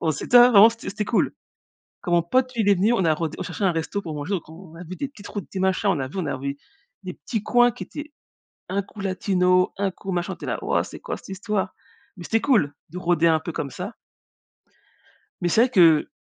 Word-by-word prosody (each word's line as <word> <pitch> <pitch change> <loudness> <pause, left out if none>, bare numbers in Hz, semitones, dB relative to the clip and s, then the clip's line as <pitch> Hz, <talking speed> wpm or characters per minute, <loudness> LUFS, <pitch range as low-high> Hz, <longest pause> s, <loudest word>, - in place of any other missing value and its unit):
On 160 - +1
s'était 235 +10 +1
avant, 230 -3 +8
c'était 230 0 -9
c'était 210 +2 -3
cool. 230 - +1 0.7
Quand 175 - -4
mon 170 - +4
pote 255 +9 +1
il 215 -3 +1
est 200 - +6
venu, 205 +6 +2
on 190 -6 +1
a 160 - +4
rôd 160 0 -3
on - - -3
cherchait 200 - -4
un 185 - +3
resto 165 +5 -3
pour 165 -5 -6
manger, 150 +5 -5
donc 170 -4 -5
on 165 0 -13
a 175 - -9
vu 180 +2 -8
des 280 - -3
petites 210 -7 -13
routes, 205 - -6
des 190 - -4
machins, 190 +2 +1
on 170 - 0
a 130 - -3
vu 150 - -11
on 175 - -2
a 140 -2 -2
vu 140 +1 -4 0.5
des 185 -1 -6
petits 220 -4 -4
coins 245 +2 +4
qui 245 - -7
étaient 295 0 -9 0.6
un 195 +2 0
coup 205 +2 -15
latino, 185 -1 +1
un 195 -1 0
coup 195 +1 -7
machin, 175 -1 -2
on - - -9
était - - -9
là: - - -1
«Wouah! - - +1
C'est - - -10
quoi - - -5
cette - - -15
histoire?» 195 +1 -2 0.4
mais 175 - -9
c'était 225 +6 +1
cool, 205 - +2 0.2
de 175 - -8
rôder 170 -2 +2
un 160 -1 +3
peu 165 +2 -6
comme 145 -3 -4
ça. 205 +5 -7 1.5
Mais 175 - +1
c'est 220 - +4
vrai 255 - +4
que 165 -9 +5
185 Hz, 250 wpm, -23 LUFS, 170-210 Hz, 1.5 s, avant